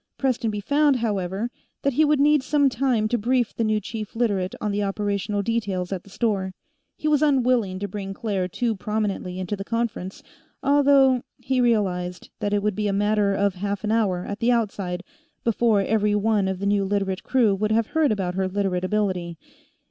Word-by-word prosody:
Prestonby 230 -6 -1
found, 285 +5 +3
however, 205 -1 -2 0.3
that 280 - +1
he 310 - +4
would 300 -1 +3
need 295 0 +4
some 285 +1 +2
time 245 -3 +1
to 240 +2 0
brief 245 +1 +1
the 230 - 0
new 215 -1 +1
chief 215 +1 -7
Literate 205 -5 0
on 210 - -1
the 205 +1 -1
operational 205 0 -1
details 200 -5 -2
at 185 - -5
the - - -17
store. 195 -3 -1 0.4
He 310 - -3
was 300 -1 +3
unwilling 250 -9 +2
to 205 +2 -3
bring 195 0 -5
Claire 195 -5 -2
too 230 +5 -1
prominently 200 -3 -2
into 185 +2 -3
the 195 - -6
conference, 230 -4 -3 0.4
although 275 -2 +4 0.2
he 260 -1 0
realized 185 -7 0
that 205 - -1
it 205 -1 +1
would 210 -2 0
be 210 0 -1
a - - +1
matter 205 0 +2
of 200 0 +1
half 200 +2 -3
an 215 - 0
hour, 195 -6 +1
at 205 - -5
the 240 +1 +2
outside, 200 -6 -1 0.4
before 230 -2 +2
every 210 +1 +1
one 210 -1 +2
of 190 -1 -2
the 200 - -4
new 200 0 +2
Literate 195 -1 -1
crew 240 -6 +2
would 210 +2 -1
have 225 +1 +3
heard 310 +1 +1
about 190 -4 -1
her 190 0 0
Literate 185 -2 -1
ability. 185 -4 -1
210 Hz, 195 wpm, -24 LUFS, 195-235 Hz, 0.4 s, he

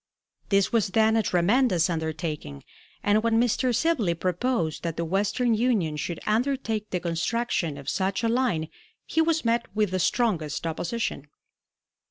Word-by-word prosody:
This 200 +2 +2
was 225 -3 +3
then 220 +3 +3
a 225 - +4
tremendous 185 0 +2
undertaking, 160 - -4 0.4
and 205 +1 +3
when 225 0 +2
Mr. 245 +2 +2
Sibley 235 - +1
proposed 180 -1 -1
that 165 -2 -4
the 170 - -1
Western 205 +7 +1
Union 215 -9 +1
should 165 +3 -4
undertake 225 -1 -1
the 180 - -1
construction 170 -1 -1
of 140 - -11
such 195 +3 -1
a - - +3
line 225 -10 0 0.4
he 320 - +1
was 320 -3 +1
met 235 +1 +1
with 210 -3 +1
the 185 - 0
strongest 170 - 0
opposition. 165 -1 -3
205 Hz, 150 wpm, -26 LUFS, 170-235 Hz, 0.4 s, a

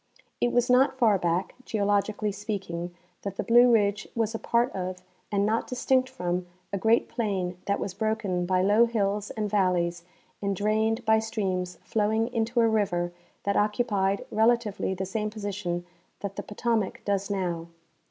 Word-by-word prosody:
It 240 - +3
was 245 0 +2
not 265 +2 +4
far 220 -6 +4
back, 175 +1 0
geologically 205 -1 0
speaking, 195 -4 -4 0.3
that 200 -1 -5
the - - -2
Blue 240 +1 +6
ridge 205 -3 +2
was 225 -1 0
a 225 - -3
part 235 +2 +1
of, 185 -1 -5 0.3
and 200 -1 +2
not 220 +2 0
distinct 255 +1 +1
from, 180 -8 -2 0.3
a - - +1
great 225 +3 +3
plain 185 -6 -2
that 200 - +1
was 190 - -3
broken 200 -4 -1
by 185 0 +2
low 210 +4 +5
hills 205 -3 -1
and 215 -1 -2
valleys 180 -4 +1 0.4
and 200 -1 0
drained 220 +3 +1
by 220 0 +5
streams 190 -5 -2
flowing 220 +2 +1
into 235 +1 +1
a 230 - +5
river 190 -6 +1 0.3
that 200 0 0
occupied 205 -2 +1
relatively 220 -3 +2
the 190 +1 -3
same 210 +3 -2
position 200 -5 -4 0.4
that 200 -1 -4
the - - -3
Potomac 220 -1 -1
does 200 0 0
now. 175 -4 -2
205 Hz, 160 wpm, -27 LUFS, 190-225 Hz, 0.4 s, Blue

